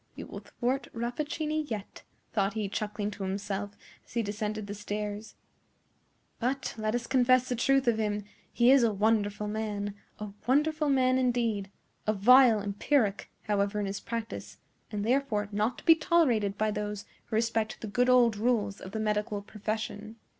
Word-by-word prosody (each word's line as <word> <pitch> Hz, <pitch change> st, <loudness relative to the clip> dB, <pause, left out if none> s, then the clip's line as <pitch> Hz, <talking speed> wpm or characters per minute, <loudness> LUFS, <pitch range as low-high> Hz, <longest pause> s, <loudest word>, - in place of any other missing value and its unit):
"We -, -, -7 dB
will -, -, -8 dB
thwart 260 Hz, +2 st, -2 dB
Rappaccini 300 Hz, +6 st, -2 dB
yet," 210 Hz, -3 st, -6 dB, 0.3 s
thought 200 Hz, -2 st, +1 dB
he, 215 Hz, -2 st, -1 dB
chuckling 210 Hz, +1 st, -3 dB
to 200 Hz, -, -6 dB
himself, 200 Hz, +1 st, -3 dB, 0.3 s
as -, -, -19 dB
he 235 Hz, -, +1 dB
descended 210 Hz, 0 st, -3 dB
the 205 Hz, -, -5 dB
stairs; 210 Hz, +1 st, -5 dB, 1.0 s
"but, 260 Hz, +3 st, -1 dB
let 215 Hz, 0 st, -1 dB
us 240 Hz, -1 st, -2 dB
confess 255 Hz, -1 st, +3 dB
the 250 Hz, -, -1 dB
truth 270 Hz, +2 st, +2 dB
of 225 Hz, -2 st, +3 dB
him, 210 Hz, -1 st, -1 dB, 0.3 s
he 240 Hz, +1 st, +5 dB
is 270 Hz, -1 st, +7 dB
a 230 Hz, -2 st, +3 dB
wonderful 210 Hz, 0 st, +1 dB
man—a 210 Hz, -1 st, -5 dB, 0.2 s
wonderful 300 Hz, +3 st, +2 dB
man 260 Hz, -1 st, +3 dB
indeed; 235 Hz, -6 st, 0 dB, 0.4 s
a 215 Hz, -, +3 dB
vile 230 Hz, +1 st, +6 dB
empiric, 205 Hz, +1 st, 0 dB
however, 205 Hz, 0 st, 0 dB
in 205 Hz, -, -1 dB
his 195 Hz, +1 st, -3 dB
practice, 230 Hz, -1 st, -6 dB, 0.3 s
and 205 Hz, -1 st, -2 dB
therefore 235 Hz, -5 st, +1 dB
not 215 Hz, +4 st, 0 dB
to -, -, -13 dB
be 330 Hz, -, +9 dB
tolerated 265 Hz, -, +2 dB
by 215 Hz, 0 st, +1 dB
those 210 Hz, -1 st, -4 dB, 0.2 s
who 225 Hz, -, -4 dB
respect 225 Hz, -1 st, 0 dB
the -, -, -6 dB
good 245 Hz, +5 st, +1 dB
old 245 Hz, -3 st, +5 dB
rules 210 Hz, -3 st, 0 dB
of 190 Hz, -, -9 dB
the 220 Hz, -, -2 dB
medical 210 Hz, -1 st, -1 dB
profession." 215 Hz, +1 st, -5 dB
215 Hz, 165 wpm, -29 LUFS, 205-245 Hz, 1.0 s, be